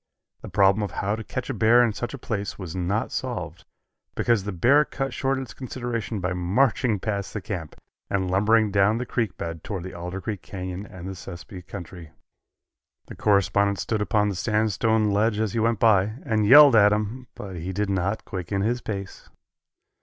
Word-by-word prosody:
The - - -8
problem 100 +1 +3
of 105 - -2
how 100 +2 -2
to 110 - -6
catch 130 +4 -4
a - - -3
bear 115 +2 +5
in 115 -3 +1
such 120 +5 -4
a - - -8
place 105 -5 -4
was 90 -4 -7
not 95 +5 -1
solved, - - -5 0.5
because 115 -4 +2
the 105 - -2
bear 125 - +4
cut 135 -2 -4
short 135 0 0
its 130 -3 -6
consideration 120 -4 -4
by 90 0 -2
marching 105 +5 +1
past 100 0 -3
the - - -1
camp 90 -6 -6 0.3
and 95 -2 -1
lumbering 105 +2 +3
down 100 +3 +3
the 125 - -3
creek 115 -3 -2
bed 85 -1 -5
toward 95 -5 -5
the 95 - -7
Alder 90 +2 -5
Creek 100 +1 -5
Canyon 95 +1 -6
and 90 0 -9
the 95 - -4
Sespe 90 +1 -10
country. 90 -4 -9 1.0
The - - -8
correspondent 100 0 +2
stood 110 +1 -2
upon 105 0 +1
the 100 - -3
sandstone 110 +1 +1
ledge 105 +1 +1
as 110 -3 -1
he 115 - 0
went 115 0 +2
by, 105 -1 +3
and 110 -5 +1
yelled 145 +1 +9
at 105 -1 +6
him, 110 +5 -2
but 95 -3 -7
he 85 +3 -4
did 100 +1 -1
not 95 +3 -1
quicken 95 0 -3
his 120 +3 0
pace. 100 -4 -6
105 Hz, 190 wpm, -25 LUFS, 95-115 Hz, 1.0 s, yelled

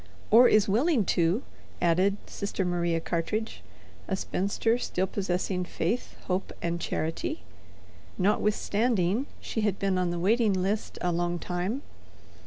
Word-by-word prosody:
"Or 240 +3 +9
is 215 -1 +4
willing 235 - +2
to," 175 +8 +2 0.4
added 185 +4 +3
Sister 200 -1 -3
Maria 175 -1 0
Cartridge, 185 +7 -2 0.5
a 190 - 0
spinster 200 +5 0
still 185 -5 -1
possessing 185 -1 -1
faith, 180 +6 -2
hope, 185 +1 -2
and 170 0 -2
charity, 165 - -2 0.7
notwithstanding 210 +2 +1
she 220 - -3
had 205 -2 +1
been 195 -2 0
on 180 -1 +1
the 175 - -2
waiting 215 +4 +3
list 195 +3 -1
a 180 - +1
long 175 0 0
time. 180 - -3
190 Hz, 130 wpm, -28 LUFS, 175-215 Hz, 0.7 s, Or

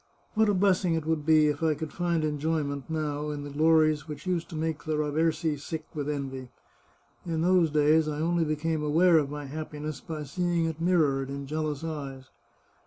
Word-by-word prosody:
What 220 -1 +3
a 205 - +2
bless 190 0 +3
ing 170 -3 +2
it 160 -2 -2
would 160 -2 -1
be 155 -1 +6
if 150 0 0
I 160 -2 +2
could 155 -1 -6
find 170 -2 0
enjoyment, 150 -1 -2
now, 150 -2 -2
in 145 -1 -4
the 145 - -7
glories 155 0 +3
which 150 +1 -8
used 175 -2 -1
to - - -7
make 155 -1 -2
the 155 -1 -1
Raversi 155 0 0
sick 155 +1 -5
with 145 -1 -3
envy! 135 -3 -4 0.7
In 165 -2 -2
those 180 -2 +4
days 155 +1 +3
I 150 -1 -3
only 170 +1 +1
became 155 +1 -1
aware 165 +3 +5
of 145 -2 -2
my 145 0 -6
happiness 150 +1 -6
by 155 -3 -5
seeing 170 +3 0
it 160 0 -4
mir 180 +1 +3
rored 135 -4 +2
in 140 0 -5
jealous 155 0 -3
eyes. 140 -5 -6
155 Hz, 200 wpm, -28 LUFS, 145-165 Hz, 0.7 s, be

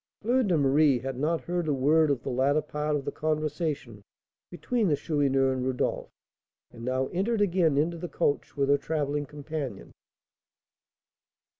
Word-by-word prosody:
Fleur 245 +4 +3
de 190 -8 +2
Marie 140 -1 +4
had 130 +2 -5
not 160 +3 0
heard 175 -2 -2
a 150 - +2
word 150 +4 +3
of 135 -4 0
the - - -3
latter 140 +4 +2
part 150 0 -2
of 140 -2 -3
the - - -2
conversation 150 - -3 0.5
between 220 +5 -1
the 150 - +3
Chourineur 135 -3 +1
and 130 -1 -3
Rodolph, 130 -1 -1 0.6
and 115 -1 -11
now 130 +2 0
entered 210 +5 0
again 175 -7 +2
into 165 +3 0
the 175 0 -5
coach 145 -2 -1
with 140 -1 +2
her 140 0 +4
travelling 145 -1 -2
companion. 145 -6 -6
150 Hz, 160 wpm, -27 LUFS, 135-165 Hz, 0.6 s, Marie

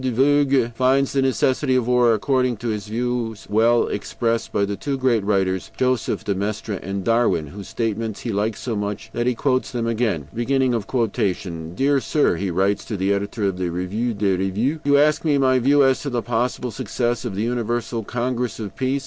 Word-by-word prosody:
de 130 -1 -1
Vogüé 135 -1 +3
finds 130 +3 +2
the 135 - +2
necessity 130 +1 +1
for 125 - +3
war, 120 -1 +4
according 125 +1 +1
to 120 +3 -4
his 105 -2 -3
views, 115 -1 -2
well 115 +2 +4
expressed 115 +3 -2
by 100 - +1
the 100 0 -3
two 135 +8 -3
great 125 -5 +2
writers, 95 -2 0
Joseph 130 -2 0
de 100 - 0
Maistre 105 +1 -3
and 95 +1 -4
Darwin, 115 -7 +2
whose 95 +6 -9
statements 110 -2 -3
he 120 - -3
likes 105 +1 -1
so 120 -3 -3
much 105 +2 -4
that 120 +1 -1
he 125 - +1
quotes 130 +1 0
them 120 -2 -2
again. 110 - -1
"Dear 115 - 0
Sir 145 - +1
[he 95 +3 -2
writes 95 +3 +1
to 105 - -4
the 95 +1 +1
editor 100 +2 -3
of 95 -2 0
the 90 -1 -1
REVUE 100 +7 -2
DES 100 -2 +1
REVUES]: 110 +11 0
You 140 0 +4
ask 150 +1 +3
me 150 -3 +2
my 130 -1 +3
view 140 +3 +4
as 135 -1 +3
to 145 - -3
the 120 -3 -2
possible 120 +1 -1
success 120 0 -2
of 115 -6 -4
the 105 - -1
Universal 120 -1 -2
Congress 125 0 -2
of 105 -3 -6
Peace. 130 +1 0
115 Hz, 195 wpm, -22 LUFS, 100-130 Hz, -, war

